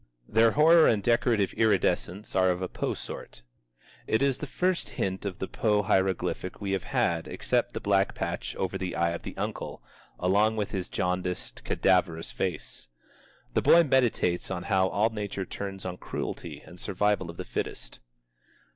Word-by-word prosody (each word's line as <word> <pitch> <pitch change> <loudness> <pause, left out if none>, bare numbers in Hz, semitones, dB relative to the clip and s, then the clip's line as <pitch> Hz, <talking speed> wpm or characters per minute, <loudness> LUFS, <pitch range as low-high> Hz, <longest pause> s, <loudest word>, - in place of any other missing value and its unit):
Their 115 +1 +5
horror 160 +2 +7
and 105 -3 +2
decorative 115 -3 +2
iridescence 105 -3 +1
are 95 -1 +4
of 90 0 0
the 95 - -2
Poe - - -3
sort. - - -8 0.6
It 110 - +2
is 140 -2 +1
the 150 - -5
first 180 +5 0
hint 95 +1 -3
of 95 -3 -3
the 95 - -4
Poe 105 -2 +1
hieroglyphic 95 -1 0
we 100 -1 -3
have 95 -2 -1
had 85 -1 0
except - - -1
the - - -1
black 100 -1 +1
patch - - -3
over - - -2
the 90 -1 -3
eye 85 0 +2
of 85 - -4
the - - -8
uncle, - - -4 0.3
along 105 +5 +3
with 105 -2 -2
his 95 -3 -3
jaundiced, 90 0 -2
cadaverous 90 -3 +1
face. 75 -10 -4 0.7
The - - +2
boy 170 +1 +7
meditates 125 - +1
on 90 -2 -3
how 95 0 +2
all 105 +4 +1
nature 100 -3 -4
turns 95 0 -6
on 90 -1 -4
cruelty - - -5
and 90 - -12
the - - -4
survival 100 -2 0
of 85 - -9
the - - -5
fittest. - - -5
95 Hz, 175 wpm, -28 LUFS, 90-110 Hz, 0.7 s, horror